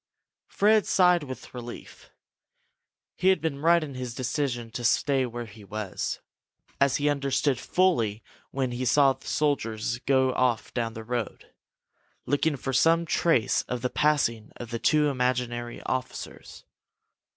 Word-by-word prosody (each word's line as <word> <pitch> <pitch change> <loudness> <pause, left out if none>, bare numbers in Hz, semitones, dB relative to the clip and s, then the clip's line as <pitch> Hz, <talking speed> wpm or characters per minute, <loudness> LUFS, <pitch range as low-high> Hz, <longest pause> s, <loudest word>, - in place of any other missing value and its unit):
Fred 215 +1 +3
sighed 180 -2 +4
with 130 -3 -9
relief. 120 -1 -9 1.1
He 185 - 0
had 190 0 +5
been 155 -4 -3
right 170 +1 +4
in 145 -3 -7
his 125 -2 -6
decision 125 -3 -2
to 120 - -5
stay 130 +2 +2
where 120 0 -6
he 105 -1 -14
was, 105 -1 -4 0.6
as 140 -1 +3
he 145 - 0
understood 140 -2 +1
fully 115 - +1 0.3
when 130 -2 -2
he 120 +1 -3
saw 135 +2 +4
the - - -16
soldiers 120 -6 -1
go 130 0 +2
off 125 -3 0
down 115 -2 -2
the 110 - -7
road, 120 -1 -4 0.7
looking 145 +1 +1
for 135 0 -4
some 165 +6 +4
trace 165 -7 +2
of 125 -1 -3
the 125 - -1
passing 145 -8 +1
of 120 -1 -9
the 115 - -3
two 150 +3 +3
imaginary 125 -2 -2
officers. 130 -1 -5
130 Hz, 145 wpm, -27 LUFS, 120-150 Hz, 1.1 s, had